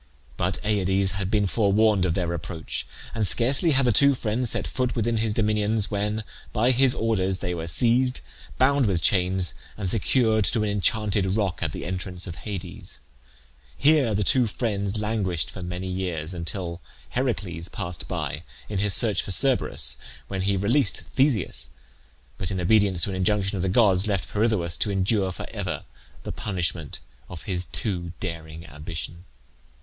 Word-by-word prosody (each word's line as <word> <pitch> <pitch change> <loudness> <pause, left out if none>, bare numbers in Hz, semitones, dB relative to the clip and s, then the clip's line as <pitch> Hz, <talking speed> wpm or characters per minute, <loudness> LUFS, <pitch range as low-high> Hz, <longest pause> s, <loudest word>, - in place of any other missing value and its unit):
But 90 +7 -1
Aides 95 -2 +1
had 95 -1 -3
been 105 -1 +2
forewarned 105 -1 +2
of 85 -2 0
their 85 -2 -1
approach, 85 -1 -5 0.3
and 110 -3 0
scarcely 130 - +6
had 135 -3 +3
the 120 - +4
two 140 +6 +5
friends 120 +1 0
set - - +1
foot 125 -1 -2
within 115 0 0
his 110 0 0
dominions 105 -1 +1
when, 105 +1 -1 0.3
by 120 +3 +2
his 130 0 +3
orders, 95 -5 0
they 90 -1 -3
were 85 -1 -5
seized, 125 +8 +3 0.4
bound 135 -1 +3
with 90 -5 0
chains, 90 -1 +1 0.2
and 100 -3 -3
secured 110 +2 +2
to 110 +1 0
an 105 - 0
enchanted 100 -1 0
rock 100 -5 -1
at 80 -4 -1
the - - -6
entrance 90 0 -4
of 85 - -5
Hades. 100 -3 -6 0.8
Here 140 -7 +4
the 105 - +1
two 125 +4 +3
friends 100 -2 -2
languished 100 -6 -1
for 95 - -9
many 90 +1 -5
years, 90 -3 -3
until 85 +1 -5 0.3
Heracles 100 -10 -2
passed 85 0 -6
by 75 - -4 0.3
in 100 -3 -2
his 100 0 +4
search 105 -6 +7
for - - -9
Cerberus, 95 - +1 0.3
when 95 -1 -3
he 100 +1 +1
released 110 +4 +1
Theseus; 120 - 0 0.7
but 90 - -2
in 95 - -2
obedience 95 -1 +2
to 100 - 0
an - - -4
injunction 95 +1 0
of 95 - -2
the 95 - 0
gods, 100 -2 +3
left 100 -4 -2
Pirithoeus 105 -7 0
to 105 - 0
endure 95 0 +1
for - - -7
ever - - -4 0.4
the - - -5
punishment 90 -6 -3 0.3
of 85 -3 -9
his 90 -2 -2
too 90 -5 -2
daring 80 -3 -6
ambition. 80 +2 -7
100 Hz, 165 wpm, -25 LUFS, 90-110 Hz, 0.8 s, search